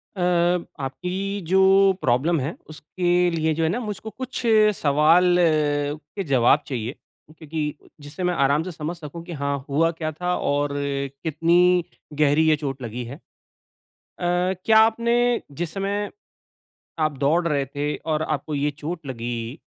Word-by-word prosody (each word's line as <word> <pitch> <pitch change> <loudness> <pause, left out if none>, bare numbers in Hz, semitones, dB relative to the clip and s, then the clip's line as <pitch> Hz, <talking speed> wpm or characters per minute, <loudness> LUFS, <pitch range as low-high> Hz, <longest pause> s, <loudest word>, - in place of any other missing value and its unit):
अ, 185 - -4 0.6
आपकी 185 +8 -3
जो 190 +1 +4 0.4
प्रॉब्लम 140 +7 +2
है 140 +6 -3
उसके 175 +3 0
लिए 160 -1 0
जो 165 - 0
है 160 - +2
ना 215 +9 -1
मुझको 220 -1 -5
कुछ 260 +2 -6 0.4
सवाल 160 +5 +4
के 150 +2 0
जवाब 135 -1 +4
चाहिए, 120 -3 -3 0.5
क्योंकि 155 -1 -5
जिससे 145 +5 -7
मैं 180 - +1
आराम 145 -1 +2
से 185 - -6
समझ 160 +2 -5
सकूँ 165 +1 -9
कि 175 - -7
हाँ 140 0 -1
हुआ 160 +4 +2
क्या 160 -1 -4
था 180 +3 -2
और 145 +1 0
कितनी 155 +6 +1 0.4
गहरी 150 +1 +4
ये 155 - +5
चोट 140 -3 -5
लगी 120 +1 -5
है। 125 +4 -8
अ, - - -16 1.0
क्या 180 +4 +2
आपने 235 +2 +3
जिस 165 +2 -5
समय, 200 +1 -2 0.9
आप 155 -1 +1
दौड़ 160 +5 +2
रहे 140 -3 0
थे 145 +2 -3
और 155 -1 -2
आपको 155 -1 -3
ये 145 +1 0
चोट 155 +2 -7
लगी, 120 +1 -5
155 Hz, 150 wpm, -23 LUFS, 145-180 Hz, 1.0 s, ये